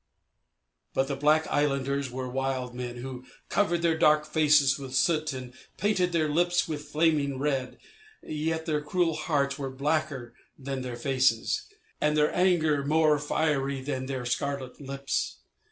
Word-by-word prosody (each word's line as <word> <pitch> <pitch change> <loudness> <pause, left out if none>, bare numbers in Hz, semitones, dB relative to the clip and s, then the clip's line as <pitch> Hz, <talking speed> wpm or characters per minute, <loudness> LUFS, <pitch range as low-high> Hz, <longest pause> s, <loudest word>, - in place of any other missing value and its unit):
But 135 - +2
the 140 - -2
black 150 +3 +3
islanders 140 -1 0
were 130 +1 -4
wild 130 -1 -2
men 125 -1 -5
who 125 0 -7 0.3
covered 175 -4 +1
their 165 -1 +3
dark 150 0 +4
faces 150 -3 +4
with 130 -2 -6
soot 155 +1 +2
and 130 -2 -7 0.2
painted 185 -3 +1
their 165 -2 +1
lips 175 +3 +2
with 150 -2 -4
flaming 150 -3 +2
red, 135 -2 -1 0.5
yet 160 +1 -2
their 150 -2 0
cruel 165 +2 +1
hearts 145 -3 -1
were 135 -1 -3
blacker 140 -2 -2 0.2
than 135 -1 -4
their 125 -2 -5
faces, 130 -3 +1 0.3
and 150 0 +2
their 150 0 +3
anger 160 -6 +3
more 155 0 +3
fiery 145 -2 0
than 130 -1 -4
their 130 -2 -4
scarlet 135 +2 -3
lips. 135 - -3
145 Hz, 150 wpm, -28 LUFS, 130-155 Hz, 0.5 s, dark